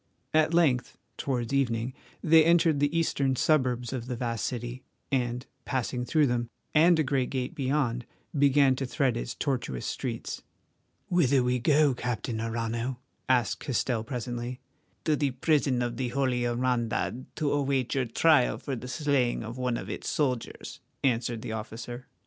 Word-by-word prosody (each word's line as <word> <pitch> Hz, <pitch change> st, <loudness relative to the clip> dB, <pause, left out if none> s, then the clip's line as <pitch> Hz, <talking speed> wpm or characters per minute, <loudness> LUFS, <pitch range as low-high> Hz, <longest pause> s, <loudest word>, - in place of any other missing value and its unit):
At 155 Hz, 0 st, +4 dB
length, 155 Hz, -8 st, +2 dB, 0.2 s
towards 125 Hz, -2 st, -2 dB
evening, 125 Hz, -2 st, 0 dB, 0.3 s
they 160 Hz, 0 st, +7 dB
entered 165 Hz, -2 st, +4 dB
the 145 Hz, +3 st, +1 dB
eastern 140 Hz, -5 st, +1 dB
suburbs 125 Hz, -4 st, +1 dB
of 125 Hz, -2 st, -4 dB
the 125 Hz, -, -2 dB
vast 115 Hz, -2 st, -2 dB
city 120 Hz, +1 st, -5 dB, 0.3 s
and, 125 Hz, -1 st, 0 dB, 0.2 s
passing 125 Hz, -1 st, -2 dB
through 155 Hz, +3 st, +3 dB
them 120 Hz, -2 st, -1 dB, 0.2 s
and 165 Hz, +2 st, +6 dB
a 155 Hz, -, +3 dB
great 130 Hz, -2 st, 0 dB
gate 130 Hz, -2 st, -3 dB
beyond, 130 Hz, -4 st, -1 dB, 0.3 s
began 140 Hz, -1 st, +5 dB
to 135 Hz, -, -2 dB
thread 130 Hz, -1 st, +1 dB
its -, -, -4 dB
tortuous 120 Hz, -, -2 dB
streets. -, -, -4 dB, 0.7 s
"Whither 150 Hz, -7 st, +3 dB, 0.2 s
go 150 Hz, +4 st, +4 dB
we, -, -, 0 dB
Captain 120 Hz, -2 st, -3 dB
Arrano?" 115 Hz, +2 st, -2 dB, 0.3 s
asked 120 Hz, -5 st, +2 dB
Castell 125 Hz, -4 st, -1 dB
presently. 120 Hz, 0 st, -4 dB, 0.4 s
"To 155 Hz, -, +2 dB
the 145 Hz, -1 st, +1 dB
prison 130 Hz, -1 st, +1 dB
of 120 Hz, -1 st, -3 dB
the 130 Hz, -, -1 dB
Holy 125 Hz, -1 st, 0 dB
Hermandad 120 Hz, 0 st, -1 dB
to 150 Hz, -2 st, 0 dB
await 135 Hz, -3 st, 0 dB
your 135 Hz, -2 st, +1 dB
trial 135 Hz, +3 st, +3 dB
for 135 Hz, -, -4 dB
the 125 Hz, +1 st, -7 dB
slaying 130 Hz, -3 st, +1 dB
of 115 Hz, +3 st, -7 dB
one 125 Hz, -2 st, 0 dB
of -, -, -6 dB
its -, -, -4 dB
soldiers," 130 Hz, -6 st, -2 dB, 0.2 s
answered 120 Hz, -3 st, 0 dB
the -, -, -4 dB
officer. 115 Hz, +3 st, -6 dB
125 Hz, 155 wpm, -28 LUFS, 120-140 Hz, 0.7 s, they